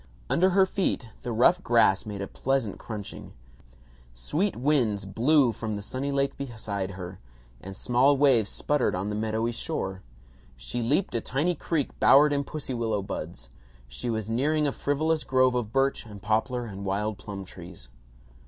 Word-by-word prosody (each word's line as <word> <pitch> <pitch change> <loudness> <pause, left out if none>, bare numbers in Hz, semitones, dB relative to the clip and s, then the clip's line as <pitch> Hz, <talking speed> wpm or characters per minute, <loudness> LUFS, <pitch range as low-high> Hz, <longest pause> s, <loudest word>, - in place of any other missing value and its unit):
Under 185 +2 +4
her 190 +1 +5
feet 185 - -1
the 120 - -4
rough 125 +11 +4
grass 115 - +3
made 100 -2 -5
a - - -5
pleasant 130 -5 -1
crunching. 105 -3 -8 0.8
Sweet 160 - -1
winds 120 -7 +1
blew 125 +6 +3
from 110 0 -4
the 100 - -6
sunny 130 +6 -3
lake 140 0 0
beside 110 -7 -4
her, 90 0 -7 0.4
and 95 0 -9
small 130 +3 +3
waves 130 -7 +4
sputtered 145 -8 0
on 95 +3 -2
the 105 - -2
meadowy 110 +2 -1
shore. 95 -7 -4 0.6
She - - -4
leaped 145 - +1
a 115 - 0
tiny 145 +10 0
creek 160 -2 -1
bowered 145 +2 +6
in 140 0 0
pussy 145 -3 -5
willow 110 -4 -1
buds. 80 -9 -6 0.4
She - - -5
was 110 -2 -2
nearing 150 +7 +1
a 140 - +1
frivolous 155 +5 0
grove 130 -1 +3
of 120 -4 -2
birch 135 +2 +1
and 105 -2 -10
poplar 110 +4 0
and 100 -3 -7
wild 100 +1 -2
plum 100 -2 -7
trees. 90 -7 -12
120 Hz, 165 wpm, -27 LUFS, 100-140 Hz, 0.8 s, bowered